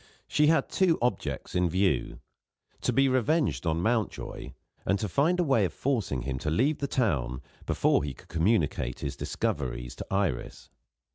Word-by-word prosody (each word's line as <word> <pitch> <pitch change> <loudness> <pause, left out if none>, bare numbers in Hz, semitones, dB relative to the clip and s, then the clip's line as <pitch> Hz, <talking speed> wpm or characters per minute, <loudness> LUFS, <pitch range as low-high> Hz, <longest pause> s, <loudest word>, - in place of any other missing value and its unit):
She 150 0 +3
had 155 -3 +3
two 180 -4 +2
objects 120 +1 -2
in 90 -1 +2
view 95 +3 0 0.6
to - - +1
be 135 +3 +4
revenged 130 - +1
on 80 +1 0
Mountjoy, 115 0 -2 0.3
and 100 - +1
to 105 - -2
find 155 - +2
a - - +4
way 135 -9 +3
of 90 - -1
forcing 110 - -1
him 65 -1 -3
to 75 - -2
leave 130 - +2
the 140 - -1
town 70 - 0 0.3
before - - +2
he 70 -3 -4
could - - -17
communicate 85 +1 0
his 70 - -3
discoveries - - -3
to - - -6
Iris. 95 -10 -2
100 Hz, 165 wpm, -28 LUFS, -, 0.6 s, be